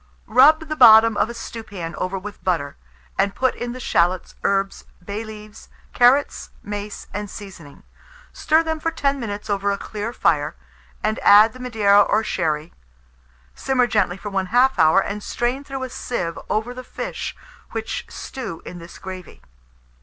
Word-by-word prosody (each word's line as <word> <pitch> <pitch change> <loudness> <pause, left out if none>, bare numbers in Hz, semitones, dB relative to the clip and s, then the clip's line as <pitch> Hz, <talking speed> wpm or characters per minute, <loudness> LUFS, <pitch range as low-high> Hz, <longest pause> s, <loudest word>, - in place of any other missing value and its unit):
Rub 275 +8 +6
the 310 -1 -4
bottom 225 -4 +8
of 215 - +1
a - - -5
stewpan 205 -7 -7
over 185 +1 -3
with 205 +2 -9
butter, 165 -6 -1 0.4
and 200 - +1
put 260 0 +1
in 240 0 -5
the 255 - -7
shalots, 180 -5 +1
herbs, 195 0 0 0.2
bay 205 +3 -4
leaves, 215 -1 -11 0.2
carrots, 255 +4 +3
mace, 205 0 -6
and 205 0 -4
seasoning; 185 -9 -11 0.5
stir 315 +1 +2
them 320 -1 -2
for 330 - -1
10 280 -4 -1
minutes 210 -4 -5
over 200 0 0
a 200 - -1
clear 210 +3 -5
fire, - - +1 0.5
and 215 +1 0
add 215 +2 +7
the 255 - -12
Madeira 215 -5 +4
or 215 +2 +2
sherry; 160 -5 -2 0.8
simmer 265 -2 +1
gently 205 -6 0
for 205 +1 -7
1/2 240 +8 +2
hour, 160 +4 +6
and 200 +2 -3
strain 245 +6 -2
through 270 -2 -6
a 260 - -4
sieve 240 -10 -4
over 220 +3 -1
the 255 0 -8
fish, - - -5 0.3
which - - -4
stew 220 -11 -7
in 175 - -8
this 170 +1 -12
gravy. 185 -3 -9
210 Hz, 160 wpm, -22 LUFS, 195-250 Hz, 0.8 s, bottom